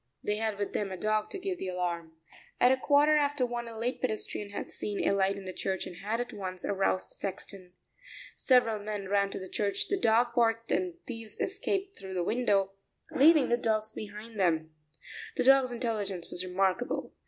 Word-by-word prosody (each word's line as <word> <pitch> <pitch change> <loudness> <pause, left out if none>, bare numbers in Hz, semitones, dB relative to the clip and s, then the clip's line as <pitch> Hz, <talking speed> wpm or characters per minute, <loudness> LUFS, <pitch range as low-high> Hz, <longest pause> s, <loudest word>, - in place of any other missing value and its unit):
They 210 0 0
had 220 -2 -1
with 205 -1 -3
them 200 -2 -1
a 185 - -4
dog 215 +2 0
to 395 - -4
give 375 -1 -3
the - - -3
alarm. 175 -3 -3 0.5
At 245 - +6
a - - +5
quarter 290 +3 +4
after 290 -3 +2
one, 240 -1 -4
a 230 -1 -8
late 240 +3 -2
pedestrian 215 -3 -2
had 200 - -6
seen 205 -1 -2
a - - +4
light 195 0 +2
in 195 - -8
the 185 - -5
church 190 0 -2
and 180 -2 -8
had 215 +5 -2
at 245 - -3
once 185 -2 -5
aroused 195 -1 0
the - - -17
sexton. 190 -1 -6 0.6
Several 245 -5 +3
men 205 -2 -4
ran 200 0 +2
to - - -5
the 190 - -6
church; 200 0 -1
the 395 - +1
dog 235 -3 +3
barked 230 -1 +2
and 365 -1 +1
the - - -27
thieves 230 -4 -7
escaped 395 0 -2
through 190 -1 -7
the 180 - 0
window, 200 -3 +2 0.4
leaving 305 0 +6
the 240 - +3
dog 220 -2 +1
behind 215 +1 -8
them. 160 -4 +1 0.6
The - - +2
dog's 265 -1 +6
intelligence 210 -7 -3
was 180 - -2
remarkable. 190 +5 0
215 Hz, 200 wpm, -30 LUFS, 195-245 Hz, 0.6 s, At